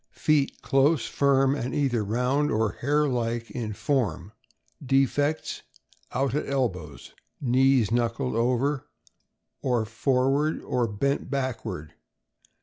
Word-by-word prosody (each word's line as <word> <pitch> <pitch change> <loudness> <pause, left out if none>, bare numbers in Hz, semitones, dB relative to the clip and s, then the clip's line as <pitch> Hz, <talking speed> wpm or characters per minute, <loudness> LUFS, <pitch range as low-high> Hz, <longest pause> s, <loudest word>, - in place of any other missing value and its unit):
Feet 150 -3 +1
close, 135 0 +3
iirm, 135 -1 +3
and 130 -2 -3
either 130 -6 +1
round 125 +7 +1
or 110 -5 +1
hare 150 +3 +2
like 120 -2 -2
in 110 -3 -4
form. 105 -7 -1 0.5
Defects: 140 +3 +1 0.5
Out 135 +1 0
at 150 - -2
elbows. 90 - -3 0.3
Knees 130 -3 +3
knuckled 120 +2 0
over 125 +4 0 0.7
or 120 -4 +1
for 125 +4 +1
ward, 150 +3 +1
or 120 -2 0
bent 140 +9 -1
backward. 115 - -3
130 Hz, 115 wpm, -26 LUFS, 115-140 Hz, 0.7 s, close